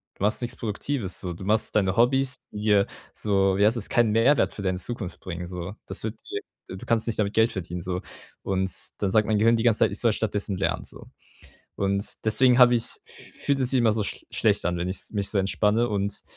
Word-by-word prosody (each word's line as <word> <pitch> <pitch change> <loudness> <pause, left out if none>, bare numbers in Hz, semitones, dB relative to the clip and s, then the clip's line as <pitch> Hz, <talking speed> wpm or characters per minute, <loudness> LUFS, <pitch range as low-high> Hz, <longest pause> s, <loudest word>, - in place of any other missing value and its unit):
Du - - -7
machst 105 +4 +1
nichts 120 0 -3
Produktives 110 -1 -3
so. 90 -2 -4
Du 90 - -9
machst 110 +1 +1
deine 95 -2 +2
Hobbys, 135 +3 +2
die 105 - -7
dir 105 -2 +3 0.3
so, 95 -2 +1
wie 100 - +4
heißt 115 +3 +3
das, 100 - -4
keinen 120 -4 +3
Mehrwert 115 +7 +3
für - - -7
deine 95 -1 0
Zukunft 105 -6 -5
bringen 90 -1 -5
so. 90 +2 -6
Das - - -5
wird 110 +1 -3 0.2
dir 410 +1 -3 0.3
du 95 - -8
kannst 115 0 +1
nicht 115 - -2
damit 100 0 0
Geld 110 +1 +4
verdienen 90 -1 -5
so.“ 90 0 -3 0.4
Und 95 -1 0 0.3
dann 100 - +1
sagt 110 +1 +3
mein 110 -1 +2
Gehirn 115 +2 +5
die 115 - 0
ganze 115 -2 +3
Zeit, - - +4
ich - - -3
soll 115 -3 +3
stattdessen 105 -2 -2
lernen 95 - -1
so. - - -10 0.7
Und 100 +2 -2
deswegen 125 +3 +4
habe 125 0 +8
ich, 115 - -1 0.2
f - - -10
fühlt 140 -1 +2
es 130 0 +1
immer 120 -4 +4
so 105 -2 -1
sch - - -6
schlecht - - +1
an, 90 0 0
wenn 90 +1 -2
ich's 95 - -5
mich 100 -2 -1
so 105 - 0
entspanne. 105 +4 +2
Und 100 -1 -2
105 Hz, 230 wpm, -25 LUFS, 95-115 Hz, 0.7 s, habe